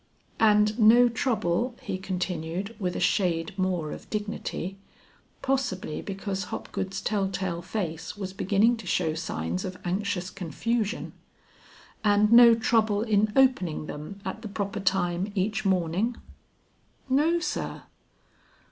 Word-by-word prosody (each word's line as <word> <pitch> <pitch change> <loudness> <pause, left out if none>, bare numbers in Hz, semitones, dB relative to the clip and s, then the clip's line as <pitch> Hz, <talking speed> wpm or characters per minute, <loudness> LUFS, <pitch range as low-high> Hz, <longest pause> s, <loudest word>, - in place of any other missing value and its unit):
"And 210 0 +4
no 235 +3 +7
trouble," 230 -1 0
he 185 - -4
continued, 185 +1 -3
with 180 -3 -2
a - - -2
shade 175 0 +1
more 185 -5 -1
of - - -9
dignity, 205 -3 -4 0.7
possibly 245 - -1
because 195 -1 -4
Hopgood's 190 +1 -4
tell 200 -3 0
tale 180 -3 -3
face 170 -2 -4
was 190 -2 -5
beginning 205 +5 +2
to 220 -4 -10
show 165 -2 +1
signs 85 - -3
of 185 0 -5
anxious 185 0 -2
confusion, 210 - -2 0.9
"and 210 0 +4
no 235 -1 +9
trouble 220 -2 +2
in 215 -1 +2
opening 250 -14 +3
them 155 +7 -7
at 190 +3 -4
the 225 - -6
proper 200 0 -3
time 190 0 0
each 210 +3 -1
morning?" 190 +5 +1 0.9
"No 300 +6 +3
sir." 340 - -4
195 Hz, 125 wpm, -27 LUFS, 180-220 Hz, 0.9 s, no